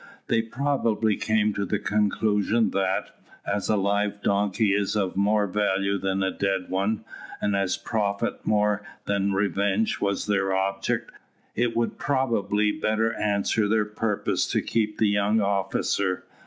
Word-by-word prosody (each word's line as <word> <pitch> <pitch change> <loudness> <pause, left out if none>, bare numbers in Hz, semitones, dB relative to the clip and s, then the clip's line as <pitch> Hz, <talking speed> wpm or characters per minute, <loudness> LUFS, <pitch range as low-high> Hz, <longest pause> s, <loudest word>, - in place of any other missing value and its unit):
They 115 - +3
probably 115 -3 0
came 110 0 +1
to 100 - -2
the 100 - -1
conclusion 105 +2 +1
that, 95 -1 -1 0.3
as 100 0 -2
a 110 - +4
live 100 +1 0
donkey 100 +1 +2
is 100 +1 0
of 100 -3 0
more 105 +2 +2
value 100 0 0
than 95 0 -1
a 95 - 0
dead 95 -2 -2
one, 100 +3 -1 0.3
and 100 -1 0
as 95 -2 0
profit 100 -3 -2
more 105 -1 +2 0.2
than 100 0 0
revenge 100 +2 0
was 100 0 0
their 100 -2 +1
object, 95 0 -1 0.4
it 120 0 0
would 120 - -1
probably 105 -7 +1
better 110 +1 0
answer 105 +1 0
their 105 0 +2
purpose 105 0 -1
to - - 0
keep 105 -2 -1
the 110 - +3
young 100 +2 +2
officer? 100 -1 0
105 Hz, 145 wpm, -25 LUFS, 100-110 Hz, 0.4 s, a